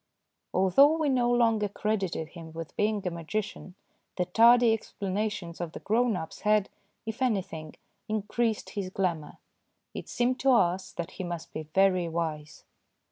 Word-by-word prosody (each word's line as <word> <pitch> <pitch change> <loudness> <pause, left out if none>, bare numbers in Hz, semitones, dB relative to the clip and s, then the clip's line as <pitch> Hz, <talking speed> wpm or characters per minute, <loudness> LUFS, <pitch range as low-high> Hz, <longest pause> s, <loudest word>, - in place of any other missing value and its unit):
Although 270 - +5
we 310 -3 +1
no 245 -2 +2
longer 225 -4 +2
credited 195 -6 -2
him 165 -2 -11
with 165 -1 -7
being 210 -1 0
a 180 - 0
magician, 180 +2 -5 0.4
the 180 - +1
tardy 230 +5 +6
explanations 200 -4 -3
of 170 -2 -4
the - - -7
grown 230 +1 +1
ups 160 -3 -6
had, 210 -1 +2 0.4
if 225 +4 -6
any 220 -7 +2
thing, 155 -3 -9 0.3
increased 215 +1 -1
his 195 -3 -4
glamour. 175 -5 -2 0.6
It - - -7
seemed 250 +1 0
to 270 -1 +4
us 185 -4 +2
that 170 +1 -5
he 190 - -6
must 175 -2 -6
be 155 -1 -6
very 185 -3 +3
wise. 160 -2 -4
195 Hz, 155 wpm, -28 LUFS, 170-225 Hz, 0.6 s, tardy